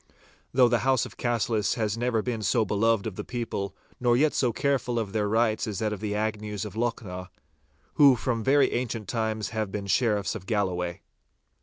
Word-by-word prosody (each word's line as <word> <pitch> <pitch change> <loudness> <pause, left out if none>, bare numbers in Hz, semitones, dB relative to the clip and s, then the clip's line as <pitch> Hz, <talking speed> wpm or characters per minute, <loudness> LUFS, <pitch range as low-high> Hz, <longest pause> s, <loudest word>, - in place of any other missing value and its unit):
Though 125 -1 +5
the 120 0 +2
house 130 +1 +2
of - - -11
Cassillis 115 -3 0
has 110 -3 -1
never 115 -2 0
been 120 -3 -2
so 110 +1 +2
beloved 110 +1 +1
of 105 -4 -5
the - - -3
people 105 -5 -4 0.2
nor 120 -1 +3
yet 150 +3 +3
so 125 -3 +2
careful 125 -1 0
of 105 -4 -2
their 105 -2 0
rights 110 0 +1
as 105 -3 -3
that 110 +1 -1
of 105 - -6
the 105 -1 -2
Agnews 105 -1 -2
of 105 - -7
Lochnaw, 105 -5 -3 0.7
who 140 -3 +7
from 115 -2 -2
very 135 +1 +4
ancient 115 -4 -3
times 110 -1 -2
have 110 -3 -3
been 100 -1 -4
Sheriffs 105 -1 +1
of 95 -4 -8
Galloway. 90 -5 -1
110 Hz, 190 wpm, -27 LUFS, 105-120 Hz, 0.7 s, who